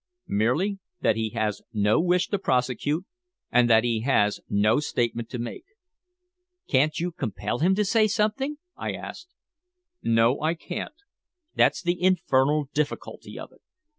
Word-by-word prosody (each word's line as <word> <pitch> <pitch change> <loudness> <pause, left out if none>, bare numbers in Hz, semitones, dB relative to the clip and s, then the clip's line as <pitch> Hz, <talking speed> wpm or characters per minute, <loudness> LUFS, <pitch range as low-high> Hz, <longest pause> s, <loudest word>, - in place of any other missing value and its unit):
"Merely 155 - +1 0.2
that 110 - +3
he 110 0 -1
has 110 -2 -1
no 105 +2 +3
wish 180 +1 +2
to 200 - 0
prosecute, 140 +3 0 0.5
and 125 -1 +4
that 110 -1 +6
he 115 -2 0
has 105 -5 +2
no 105 +5 +3
statement 120 -5 -2
to 125 - -5
make." 120 - -6 1.0
"Can't 145 +3 +2
you 175 +1 -1
compel 110 - -3
him 185 +4 +3
to 210 +1 +1
say 215 +2 +3
something?" 225 +8 0 0.2
I - - -4
asked. 355 +1 -9 0.7
"No, 115 +3 +3
I 160 +2 +1
can't. 180 - -6 0.6
That's 190 - +3
the 175 0 -1
infernal 150 -5 +2
difficulty 150 0 -3
of - - -8
it. - - -24
140 Hz, 145 wpm, -26 LUFS, 115-180 Hz, 1.0 s, that